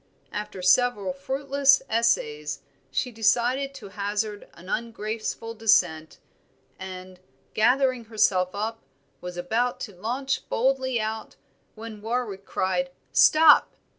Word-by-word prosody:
After 210 -3 -6
several 200 -1 +3
fruitless 275 +7 +2
essays 445 - 0 0.3
she 250 - -2
decided 245 +5 +1
to 215 -7 -10
hazard 205 +1 -3
an 175 - -14
ungraceful 225 +1 -4
descent; 180 -8 +2 0.6
and, 185 -1 -9 0.3
gathering 255 +2 +2
herself 195 -4 +2
up, 220 +2 -3 0.4
was 180 0 -7
about 240 +8 -1
to 205 -5 -7
launch 255 +8 -3
boldly 260 0 +1
out, 220 0 -4 0.4
when 220 -1 -9
Warwick 220 -4 -3
cried, 180 -1 -1 0.2
"Stop!" 310 -1 +6
225 Hz, 105 wpm, -25 LUFS, 195-250 Hz, 0.6 s, Stop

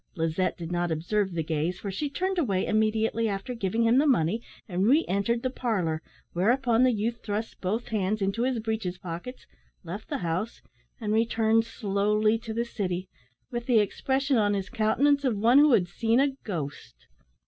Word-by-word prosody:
Lizette 165 +2 0
did 170 -1 -6
not 175 0 0
observe 190 +5 0
the 165 -1 -1
gaze, 160 +3 -1
for 200 - -4
she 290 +10 -3
turned 370 +5 -1
away 195 - +1
immediately 220 +1 +1
after 200 +5 -4
giving 225 0 -1
him 230 +3 +4
the 300 - +3
money, 220 - +2 0.3
and 185 +1 0
re 295 +7 +4
entered 215 +5 0
the 255 - +1
parlour, 185 -12 -1 0.3
whereupon 235 +5 +2
the 255 0 +5
youth 230 +1 -2
thrust 215 +1 -4
both 210 +6 -2
hands 210 -1 0
into 195 +3 -1
his 255 0 +1
breeches 220 -5 -3
pockets, 180 +8 -7 0.4
left 185 +5 -7
the - - -1
house, 180 +8 -3 0.4
and 215 -2 -1
returned 225 0 +2
slowly 210 0 +1
to 225 0 -7
the 230 +2 -1
city, 185 -5 -3 0.4
with 240 -1 -4
the 245 -3 +4
expression 265 +6 +1
on 205 -2 +2
his 195 -1 -3
countenance 275 +5 +2
of 250 -6 +1
one 235 +6 +5
who 300 0 +6
had 180 -6 +3
seen 225 +6 +1
a 280 +1 +4
ghost. 140 - -6
215 Hz, 180 wpm, -27 LUFS, 185-235 Hz, 0.4 s, who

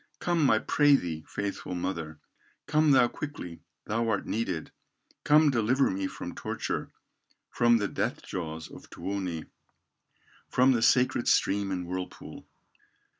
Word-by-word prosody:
Come, 165 -6 +2
I 110 - +5
pray 145 +5 +4
thee, 80 - -3
faithful 100 -2 -4
mother, 85 -4 -4 0.5
Come 155 0 +3
thou 130 -3 +6
quickly, 120 - -7 0.2
thou 115 +2 -1
art 100 -3 0
needed, 95 -8 -3 0.5
Come 150 0 +5
deliver 125 +3 +2
me 95 0 -2
from - - -7
torture, - - -4 0.6
From 120 -1 +4
the 105 -2 0
death - - -3
jaws 80 -3 -5
of - - -13
Tuoni, 95 -5 -4 1.0
From 130 +1 +4
the 120 -3 +2
sacred 125 +1 +3
stream 100 0 +2
and 90 -2 -3
whirlpool." 90 +1 -7
105 Hz, 130 wpm, -28 LUFS, 90-130 Hz, 1.0 s, thou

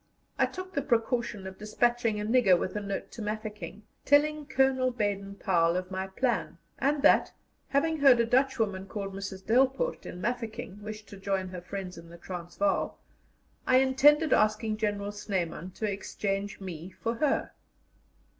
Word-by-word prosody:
I - - +4
took 370 0 -8
the 280 - 0
precaution 235 -4 0
of 190 0 -8
despatching 230 +1 +1
a 210 - -2
nigger 215 -6 +5
with 185 - -3
a - - 0
note 200 -1 -4
to 230 - -8
Mafeking, 210 -1 -5 0.2
telling 300 +1 +3
Colonel 265 -1 +3
Baden 200 -4 -2
Powell 170 -4 +2
of 185 +1 -4
my 190 0 -3
plan, 190 - -1 0.2
and 280 +1 +1
that, - - +5 0.4
having 315 +3 +1
heard 270 -4 +7
a 235 - +4
Dutch 260 +3 +2
woman 200 -4 -1
called 195 -2 -5
Mrs. 195 -1 -6
Delpoort, 265 - +2
in 175 - -7
Mafeking, 220 -2 -4
wished 215 0 -7
to 200 - -10
join 195 -1 -2
her 180 -1 -7
friends 185 -1 -6
in 165 0 -13
the 170 - -11
Transvaal, 175 - -2 0.7
I 255 - +6
intended 275 +4 +5
asking 215 0 +2
General 205 -1 -1
Snyman 185 -4 -3
to 220 - -2
exchange 200 +1 -3
me 180 -3 -7
for 230 +4 -4
her. 295 +1 +1
210 Hz, 165 wpm, -29 LUFS, 190-255 Hz, 0.7 s, heard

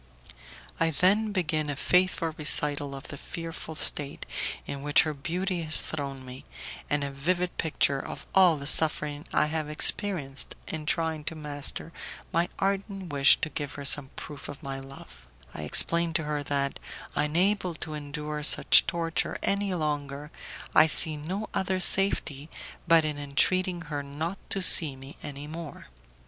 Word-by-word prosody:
I 165 - +2
then 200 +7 +2
begin 160 -6 -1
a 145 - -2
faithful 180 +1 +1
recital 145 -2 +1
of 135 - -11
the 145 - -8
fearful 165 -1 -7
state 145 -1 0 0.4
in 140 - -6
which 145 +1 +4
her 155 - -3
beauty 175 +5 -3
has 155 -1 +3
thrown 140 -3 -5
me, 125 +1 -10 0.5
and 145 0 0
a 140 - -4
vivid 175 +6 -2
picture 140 -3 +1
of - - -8
all 180 -4 +5
the 140 - -8
suffering 150 0 +1
I - - +3
have 155 0 -3
experienced 150 -3 +2
in 155 -1 -6
trying 160 -2 -1
to 165 - -5
master 150 +2 -4 0.4
my 170 +1 +1
ardent 195 -3 -3
wish 140 -1 +5
to - - -1
give 145 -1 -5
her 145 - -7
some 140 -1 +3
proof 145 -2 -8
of 145 +2 -9
my 135 -1 -5
love; 135 - -13 0.3
I - - -7
explain 170 - +5
to 160 - +1
her 150 -1 -2
that, 140 -1 -1 0.4
unable 175 +4 0
to 155 0 -6
endure 150 0 -5
such 150 - +6
torture 165 -2 -2
any 200 0 0
longer, 145 -2 -4 0.4
I 155 - +7
see 160 0 +7
no 185 +8 -4
other 190 0 -1
safety 165 -6 +3 0.4
but 165 -1 +5
in 150 -1 -3
entreating 175 +5 0
her 150 -2 -4
not 155 +7 -5
to 195 - -1
see 155 -6 +5
me 135 +1 -10
any 145 0 -8
more. 155 - -9
155 Hz, 160 wpm, -27 LUFS, 145-170 Hz, 0.5 s, I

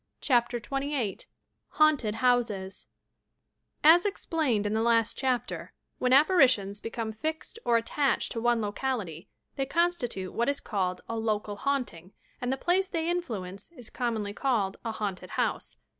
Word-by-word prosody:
CHAPTER 240 -2 +2
XXVin 275 -3 -2 0.5
HAUNTED 295 -9 +4
HOUSES 225 -6 0 1.0
i 315 +2 +10
As 345 - +3
explained 315 - 0
in 205 - 0
the 220 - +1
last 230 -1 +3
chapter, 255 -2 -2 0.3
when 250 - +1
apparitions 255 - +4
be - - -4
come 225 -1 -3
fixed 315 - -4
or 235 -1 +4
attached 270 +5 0
to 230 - -3
one 240 -1 +2
locality, 205 - -3 0.3
they 270 -1 -1
constitute 275 - 0
what 235 +3 +1
is 280 - -1
called 185 -4 -2
a 230 - -3
"local 210 -2 -1
haunting," 220 -10 -2 0.3
and 245 +1 -1
the 265 - 0
place 370 +6 +2
they 330 -3 -2
in 355 0 +1
fluence 200 - -7
is 240 - -9
commonly 220 -4 -2
called 210 -6 0
a 230 - -2
"haunted 205 -4 -4
house." - - -1
240 Hz, 155 wpm, -28 LUFS, 210-280 Hz, 1.0 s, i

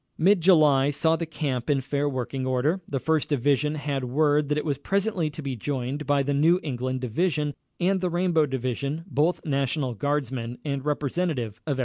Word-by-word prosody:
Mid 190 +2 +4
July 150 -6 +5
saw 160 +3 +2
the 165 0 -3
camp 135 -6 -3
in 140 -2 +3
fair 140 +2 -1
working 130 0 -3
order. 140 +9 +1
The 135 - -2
First 160 +2 0
Division 145 +2 +1
had 145 -3 -2
word 145 +3 +2
that 150 - +1
it 150 - -2
was 140 -3 -1
presently 195 -1 0
to 150 +1 -8
be 135 -2 -3
joined 135 +4 -3
by 145 -1 +3
the 140 +1 -1
New 165 +6 +4
England 130 -2 -3
Division 150 +4 0 0.3
and 190 +1 +1
the 180 - 0
Rainbow 175 -3 +2
Division, 135 +4 -3
both 165 0 0
National 140 -2 0
Guardsmen, 130 -2 -2
and 140 -2 -2
representative 145 - -2
of 145 - +1
every - - -3
State. - - -6
145 Hz, 195 wpm, -26 LUFS, 130-160 Hz, 0.3 s, July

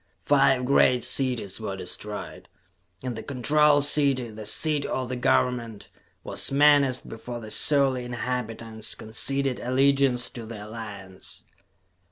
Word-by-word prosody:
Five 135 -3 +3
great 125 -2 +3
cities 125 -7 0
were 100 -3 -4
destroyed, 100 +3 -6 0.5
and 125 -2 -4
the - - -6
Control 145 +2 +2
City, 140 -5 +2
the 110 -1 -6
seat 150 +5 +1
of 130 -3 -3
the 130 - -3
government, 120 -3 -1 0.3
was - - +2
menaced 140 -2 +3
before 120 +2 -8
the 110 -2 -8
surly 135 -2 +4
inhabitants 115 -2 -4
conceded 135 +4 -2
allegiance 135 -1 +2
to 115 -4 -9
the 110 -2 -8
Alliance. 105 -4 -8
125 Hz, 125 wpm, -25 LUFS, 110-140 Hz, 0.5 s, surly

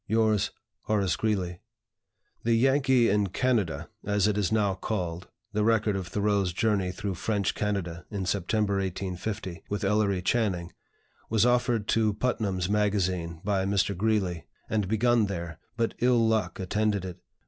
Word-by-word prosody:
"Yours, 110 -1 +2 0.4
"HORACE 100 -5 +1
GREELEY." 95 -5 -1 0.8
The 115 0 +3
"Yankee 130 0 +4
in 105 0 +2
Canada," 105 -4 0 0.2
as 100 0 +2
it 105 - +1
is 105 -2 0
now 105 -3 +2
called 90 -3 -3 0.3
(the 105 0 +1
record 110 -2 +2
of 95 -2 -3
Thoreau's 100 -2 0
journey 100 -3 +1
through 100 +1 -4
French 100 +3 -1
Canada 95 -5 -3
in 100 -3 -3
September, 100 +2 0
1850, 95 0 -4
with 105 +1 -2
Ellery 100 -2 +1
Channing), 95 -6 0 0.6
was 110 0 +3
offered 120 -3 +2
to 110 -2 +2
"Putnam's 100 -7 -1
Magazine" 95 -5 0
by 100 -2 +1
Mr. 100 0 +1
Greeley, 95 -4 0 0.2
and 105 -3 0
begun 110 +1 +3
there, 85 -4 -5 0.2
but 115 -1 0
ill 120 -2 +4
luck 110 0 0
attended 100 +1 0
it. 90 -1 -7
100 Hz, 145 wpm, -28 LUFS, 95-110 Hz, 0.8 s, Yankee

